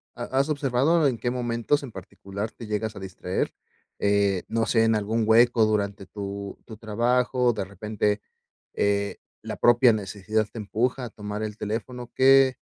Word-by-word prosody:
ha -, -, -5 dB, 0.2 s
has 140 Hz, +3 st, +1 dB
observado 145 Hz, +3 st, +2 dB
en 125 Hz, -3 st, 0 dB
qué 120 Hz, -, -2 dB
momentos 120 Hz, +3 st, 0 dB
en 125 Hz, -, -7 dB
particular 100 Hz, +3 st, -7 dB
te 115 Hz, -, -10 dB
llegas 105 Hz, 0 st, -2 dB
a -, -, -7 dB
distraer?, 95 Hz, -1 st, -3 dB, 0.5 s
eh, 100 Hz, -2 st, +2 dB
no 115 Hz, 0 st, 0 dB
sé, 115 Hz, -1 st, +3 dB
en 115 Hz, -1 st, +3 dB
algún 110 Hz, +2 st, 0 dB
hueco 115 Hz, 0 st, +5 dB
durante 100 Hz, -2 st, -1 dB
tu 100 Hz, -1 st, -6 dB
tu 110 Hz, -3 st, -10 dB
trabajo, 120 Hz, +3 st, +1 dB
o 120 Hz, -, +4 dB
de 100 Hz, -3 st, -3 dB
repente, 105 Hz, +1 st, -2 dB, 0.5 s
eh, 100 Hz, 0 st, 0 dB, 0.3 s
la -, -, -5 dB
propia 120 Hz, 0 st, +5 dB
necesidad 105 Hz, +1 st, -1 dB
te 115 Hz, -, -9 dB
empuja 120 Hz, +5 st, -1 dB
a 115 Hz, -, -6 dB
tomar 105 Hz, 0 st, -6 dB
el 105 Hz, -1 st, -4 dB
teléfono, 120 Hz, +3 st, -5 dB
¿qué 135 Hz, 0 st, +5 dB
110 Hz, 170 wpm, -25 LUFS, 100-120 Hz, 0.5 s, hueco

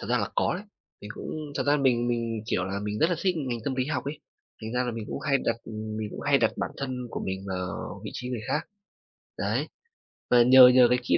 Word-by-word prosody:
Thật -, -, -6 dB
ra 125 Hz, -, +2 dB
là 100 Hz, -, -1 dB
có -, -, +1 dB
đấy. 200 Hz, +4 st, -6 dB, 0.4 s
Mình 105 Hz, -, -9 dB
cũng 155 Hz, -2 st, -6 dB
thật -, -, +1 dB
ra 145 Hz, +1 st, +4 dB
mình 125 Hz, -4 st, +2 dB
mình, 115 Hz, -2 st, -2 dB
kiểu 90 Hz, -, 0 dB
là, 100 Hz, +1 st, -3 dB
mình 105 Hz, 0 st, -3 dB
rất 160 Hz, -, +3 dB
là 175 Hz, -, +1 dB
thích 185 Hz, -2 st, +2 dB
ngành 130 Hz, -6 st, -2 dB
tâm 135 Hz, -, -1 dB
lý 130 Hz, 0 st, 0 dB
học 145 Hz, -3 st, -2 dB
ấy. 145 Hz, +2 st, -4 dB, 0.4 s
Thành 110 Hz, +1 st, -5 dB
ra 125 Hz, 0 st, +1 dB
là 125 Hz, -, -1 dB
mình 115 Hz, -2 st, -5 dB
cũng -, -, -4 dB
hay 140 Hz, -2 st, +2 dB
đặt 115 Hz, -, +1 dB
ừm, 110 Hz, -1 st, -6 dB
mình 110 Hz, -1 st, -3 dB
cũng -, -, -7 dB
hay -, -, +3 dB
đặt -, -, +2 dB
bản -, -, -2 dB
thân 130 Hz, -2 st, -4 dB
của -, -, -4 dB
mình 95 Hz, 0 st, -4 dB
vào 90 Hz, -1 st, -4 dB
vị -, -, -5 dB
trí 125 Hz, -, -5 dB
người 125 Hz, -3 st, -3 dB
khác. 150 Hz, +3 st, +1 dB, 0.8 s
Đấy, -, -, -1 dB, 0.6 s
và 120 Hz, -1 st, +6 dB
nhờ 130 Hz, +1 st, +9 dB
nhờ 125 Hz, -1 st, +7 dB
cái 125 Hz, 0 st, +3 dB
kỹ 85 Hz, -, +3 dB
125 Hz, 265 wpm, -27 LUFS, 110-135 Hz, 0.8 s, nhờ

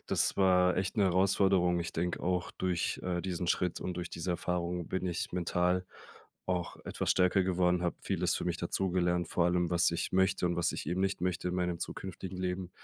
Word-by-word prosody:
Das -, -, +2 dB
war 90 Hz, -1 st, +4 dB
echt 95 Hz, 0 st, -1 dB
'ne 105 Hz, -, +4 dB
Herausforderung. 95 Hz, -1 st, +3 dB
Ich 85 Hz, -, -3 dB
denke 85 Hz, +2 st, -2 dB
auch, 90 Hz, 0 st, -1 dB
durch, 90 Hz, -2 st, -1 dB
äh, 90 Hz, -1 st, -1 dB
diesen 90 Hz, -2 st, -3 dB
Schritt 90 Hz, 0 st, 0 dB
und 90 Hz, -, -3 dB
durch 90 Hz, -, -4 dB
diese 85 Hz, +2 st, -2 dB
Erfahrung 90 Hz, -1 st, -2 dB
bin 95 Hz, 0 st, -2 dB
ich 90 Hz, 0 st, -2 dB
mental 90 Hz, +1 st, 0 dB, 0.6 s
auch 90 Hz, -2 st, -2 dB
etwas -, -, -2 dB
stärker 95 Hz, +1 st, +3 dB
geworden, 90 Hz, -1 st, +2 dB
habe 85 Hz, -, 0 dB
vieles -, -, 0 dB
für -, -, -2 dB
mich 85 Hz, -1 st, -1 dB
dazugelernt, 90 Hz, 0 st, 0 dB
vor 85 Hz, -, +1 dB
allem, 90 Hz, 0 st, +1 dB
was 85 Hz, 0 st, +3 dB
ich 85 Hz, -, -2 dB
möchte 95 Hz, -1 st, +2 dB
und 85 Hz, 0 st, 0 dB
was 85 Hz, -, +1 dB
ich -, -, -5 dB
eben 90 Hz, +3 st, -1 dB
nicht 95 Hz, -1 st, 0 dB
möchte 90 Hz, -1 st, -1 dB
in 90 Hz, -, -2 dB
meinem 90 Hz, -2 st, -1 dB
zukünftigen 95 Hz, 0 st, -6 dB
Leben. 90 Hz, 0 st, -2 dB
90 Hz, 200 wpm, -31 LUFS, 85-95 Hz, 0.6 s, war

